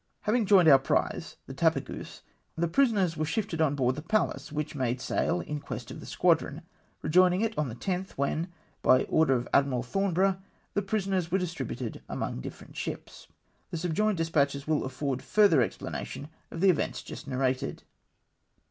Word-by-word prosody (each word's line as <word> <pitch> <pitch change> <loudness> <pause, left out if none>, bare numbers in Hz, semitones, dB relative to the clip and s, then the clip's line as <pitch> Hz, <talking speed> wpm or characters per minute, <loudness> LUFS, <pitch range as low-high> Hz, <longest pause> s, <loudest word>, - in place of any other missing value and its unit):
Having 220 0 +1
joined 185 -5 +6
our 135 -3 +9
prize 135 - -1
— - - -46
the - - -8
Tapageuse - - -1 0.2
— - - -44
the 170 +1 +1
pri 275 +12 +4
soners 190 -7 0
were 155 - -1
shifted 165 0 -1
on 145 -2 +2
board 130 -2 +2
the 150 - -6
Pallas, 155 -8 -1
which 150 0 -3
made 130 -3 -1
sail 90 -7 0
in 150 - -4
quest - - -7
of - - -8
the - - -10
squadron, - - +1 0.4
rejoining 180 +3 +4
it 225 -1 0
on 150 -3 -1
the 115 - -6
10th, 185 +8 -3
when, 150 +5 -1 0.3
by 130 0 +5
order 160 -4 +3
of 120 0 -2
Admiral 135 -3 +3
Thornborough, 190 +5 +1 0.3
the 205 - +1
prisoners 195 -3 -1
were 185 - +2
distributed 135 - -4
among - - -3
different - - -9
sliips. - - -6 0.4
The 170 - -4
subjoined 180 +5 0
despatches 145 -4 +1
will 155 -3 0
afford 130 0 -3
further 200 -1 +4
explana 120 - -2
tion 145 - -8 0.2
of 165 - -6
the 195 -1 +7
events 170 - -2
just - - -9
narrated. 130 -1 -1
160 Hz, 180 wpm, -29 LUFS, 135-190 Hz, 0.4 s, our